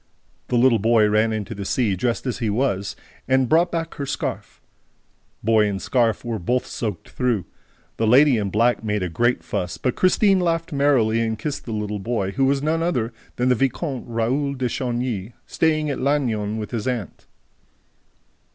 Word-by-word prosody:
The 125 - +1
little 120 -2 +4
boy 110 0 +4
ran 110 +2 +2
into 110 0 -3
the 100 -2 -6
sea, 105 0 0
dressed 120 +7 -1
as 125 -2 -2
he 115 -4 -1
was, 100 -3 -1 0.3
and 130 -1 +3
brought 165 +6 +4
her - - -26
back 165 -1 -3
her 140 -3 -5
scarf. 145 - -4 0.8
Boy 110 -1 +4
and 100 -1 -2
scarf 115 0 0
were 115 -2 -2
both 125 +8 0
soaked 105 -7 -5
through. 120 -8 -1 0.5
The 110 - +1
lady 130 +2 +6
in 100 -2 -1
black 115 +3 +2
made 105 -2 -1
a 90 - -2
great 120 +9 +1
fuss, 90 -4 -3
but 125 - -1
Christine 195 +1 +3
laughed 165 -1 -1
merrily 130 -6 +3
and 110 -1 -1
kissed 140 +6 -4
the 115 - -6
little 105 -1 -3
boy, 100 -2 -2
who 135 +5 +1
was 135 +1 +1
none 160 +2 +1
other 125 -9 -1 0.2
than 125 +1 +1
the - - +5
Vicomte 135 +2 -2
Raoul 125 +5 -1
de 130 -1 -1
Chagny, 120 -4 -3
staying 155 -2 +1
at - - -3
Lannion 115 -7 0
with 105 -1 -5
his 115 -2 -3
aunt. 120 -6 -4
120 Hz, 185 wpm, -22 LUFS, 110-135 Hz, 0.8 s, lady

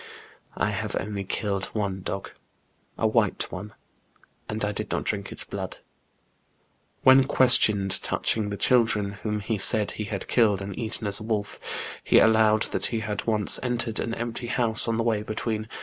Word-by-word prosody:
I 105 - +1
have 105 +1 -3
only 100 0 -4
killed 100 0 -2
one 100 -3 -2
dog, 95 +1 -5 0.7
a - - 0
white - - +2
one, 105 0 -7 0.7
and 110 0 -1
I 105 - -1
did 105 0 -5
not - - -1
drink 100 -2 -3
its - - -2
blood.'* - - -6 1.3
When 130 0 +7
questioned 110 -8 +4
touching 110 -2 -1
the 100 - -4
children, 110 -3 +2
whom 105 -1 -2
he 110 0 -2
said 105 +2 +3
he 105 - -5
had 100 -2 -5
killed 105 -5 +3
and 100 -1 -6
eaten 115 -1 -4
as 100 -1 +2
a - - -8
wolf, 105 -2 -3 0.4
he - - +4
allowed 110 -1 +5
that - - +2
he 115 -2 -2
had 105 0 -4
once 105 -3 +2
entered 120 -3 -1
an 115 - -2
empty 120 +1 -4
house 120 -1 +1
on 115 -1 0
the 115 - 0
way 110 -3 +1
between 110 0 -3
S. - - -22
110 Hz, 180 wpm, -26 LUFS, 100-115 Hz, 1.3 s, When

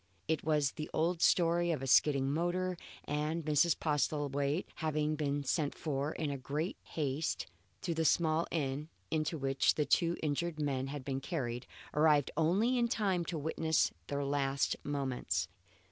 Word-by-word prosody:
It 160 -2 0
was 150 -3 +2
the 155 -1 -6
old 165 +2 +1
story 175 0 +4
of 155 -5 -1
a - - -1
skidding 135 0 +4
motor, 180 +3 0 0.3
and 150 +2 -2
Mrs. 155 +2 +3
Postlethwaite, 145 +1 0
having 155 -1 0
been 145 -1 -1
sent 145 +1 0
for 145 -1 -2
in 145 -3 -2
great 150 +7 -3
haste 150 0 -2 0.4
to 170 - 0
the 160 0 0
small 160 +1 +2
inn 145 -1 -2 0.2
into 160 +1 0
which 135 -1 +2
the 150 - +1
two 170 +2 +2
injured 155 +2 -1
men 135 -3 -1
had 140 -1 -6
been 135 -1 -2
carried, 125 -5 -3 0.3
arrived 150 -2 +4
only 195 +11 +2
in 235 - +3
time 195 -6 0
to 165 - -3
witness 160 +1 +1 0.2
their 140 0 -2
last 140 -1 +1
moments. 140 -3 -1
150 Hz, 155 wpm, -33 LUFS, 140-165 Hz, 0.4 s, story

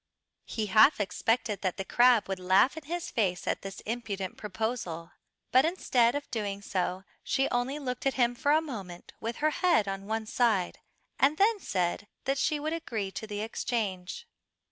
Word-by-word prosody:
He 220 - -2
half 215 +7 +6
expected 215 +1 0
that 185 -2 -1
the 195 - -3
crab 240 -2 +4
would 195 -1 -3
laugh 185 +9 +4
in 320 -2 -8
his 345 +3 -4
face 190 -6 0
at - - -1
this 195 0 -7
impudent 210 -5 -4
proposal, 195 -5 -4 0.4
but 260 +1 +6
instead 255 -8 +2
of 285 -1 -4
doing 200 -4 -3
so 185 -1 -2 0.2
she 270 0 +1
only 245 +4 0
looked 255 -2 -3
at 270 - 0
him 245 -2 +3
for 285 +4 +1
a 310 +1 +5
moment 195 - -8
with 230 +1 -3
her 310 - +4
head 290 - +2
on 195 0 -4
one 220 0 -2
side 215 -5 +1 0.4
and 285 +3 +4
then 415 +3 +3
said 185 - -1 0.2
that 275 +1 0
she 305 -2 +1
would 310 +2 -2
agree 225 -12 -3
to 220 - -6
the 205 -1 -4
exchange. 220 - -3
225 Hz, 180 wpm, -29 LUFS, 195-270 Hz, 0.4 s, half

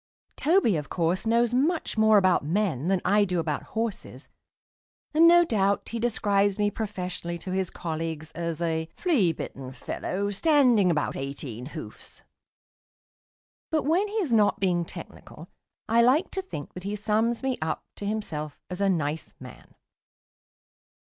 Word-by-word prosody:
Toby, 305 - +3
of 150 -2 -5
course, 175 +4 0
knows 235 +1 +2
much 310 +7 +1
more 220 -1 +5
about 185 -5 +3
men 170 -3 0
than 190 -1 +2
I 205 +3 +4
do 180 -3 -1
about 155 -3 -2 0.2
horses, 225 -3 -4 0.8
and 325 +2 +6
no 345 0 +7
doubt 200 -7 +1
he 230 - -4
describes 205 -4 +1
me 205 -1 +1
professionally 180 -5 -4
to 185 +2 -7
his 190 -1 -1
colleagues 160 -1 -5
as 170 0 -3
a 160 -1 -1
"flea 255 - +2
bitten 135 -4 -7
fellow 200 +8 -3
standing 245 - +4
about 150 -4 0
eighteen 135 -3 -5
hoofs"; - - -10 1.5
but 315 -1 +1
when 345 +8 +2
he 415 - -8
is 355 - 0
not 210 -2 +3
being 175 -3 +1
technical - - -11 0.4
I 230 +1 +4
like 265 +9 +3
to 385 - -2
think 260 - -8
that 180 - -8
he 200 +2 -3
sums 220 +4 0
me 265 -2 -1
up 155 0 -2
to 205 - -6
himself 155 -9 -4
as 180 +2 -4
a 200 - +3
nice 155 -3 -2
man. 125 -3 -13
200 Hz, 155 wpm, -26 LUFS, 165-230 Hz, 1.5 s, no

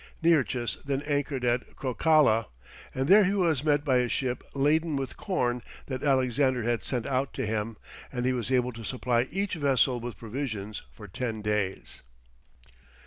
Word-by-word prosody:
Nearchus 130 -8 +2
then 140 0 -2
anchored 145 -3 -1
at 120 +1 0
Crocala, 130 -4 +3 0.5
and 130 +1 0
there 205 +4 +8
he 195 +2 +1
was 165 -8 +2
met 145 -1 +2
by 130 -3 +3
a 125 -1 +1
ship 125 -1 -1
laden 155 +3 +2
with 135 -2 -3
corn 125 -10 -1 0.2
that 130 -2 -4
Alexander 130 -2 +2
had 120 0 0
sent 125 -4 -2
out 135 0 -1
to - - -2
him, 110 0 -2 0.3
and 125 -2 -2
he 130 - +2
was 125 -1 -3
able 125 -1 +2
to 115 0 -9
supply 125 +1 0
each 195 +3 -2
vessel 135 -5 +2
with 120 -4 -6
provisions 110 -3 -5
for 105 - -11
ten 110 +2 -4
days. 105 -3 -2
130 Hz, 165 wpm, -28 LUFS, 120-145 Hz, 0.5 s, there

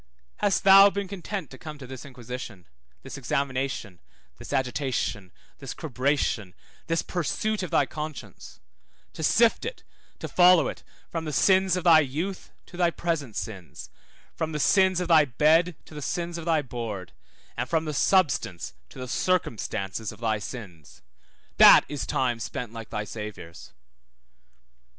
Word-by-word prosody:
Hast 205 -2 +1
thou 195 +1 +9
been 200 0 -4
content 195 -2 -6
to 130 - -11
come 155 -1 -8
to 140 - -10
this 130 0 -9
inquisition, 125 -7 -8 0.4
this - - -8
examination, 130 -9 -2 0.4
this - - -9
agitation, 125 -7 -2 0.3
this 135 -4 -7
cribration, 130 - -1 0.3
this 165 -1 0
pursuit 205 +5 -2
of 180 - -4
thy - - +3
conscience; 155 -1 -8 0.5
to - - -8
sift 225 +8 +3
it, 475 +2 -6 0.3
to - - -6
follow 180 -5 +5
it - - -7 0.3
from 165 -1 -3
the 155 - -3
sins 190 +2 +3
of 180 - -3
thy 165 -3 +7
youth 160 +7 -3
to 175 - -13
thy 175 -1 +3
present 165 -9 -3
sins, 95 -6 -7 0.4
from 160 -1 -3
the 150 - -2
sins 190 +5 +4
of 180 - -2
thy 160 -3 +6
bed 155 +6 +3
to - - -15
the 150 - -7
sins 170 +4 -3
of 165 - -8
thy 160 -3 +2
board, 115 -8 -6 0.4
and 120 +2 -3
from 160 -1 +1
the 155 - -3
substance 145 - +1 0.2
to - - -14
the 130 -1 -6
circumstance 115 - -1
of - - -14
thy 110 -2 0
sins? 95 - -10 0.5
That - - +9
is 145 -2 -5
time 120 -3 0
spent 115 0 -5
like 115 -1 -8
thy 105 -1 -3
Saviour's. 105 -6 -9
145 Hz, 155 wpm, -26 LUFS, 120-175 Hz, 0.5 s, thou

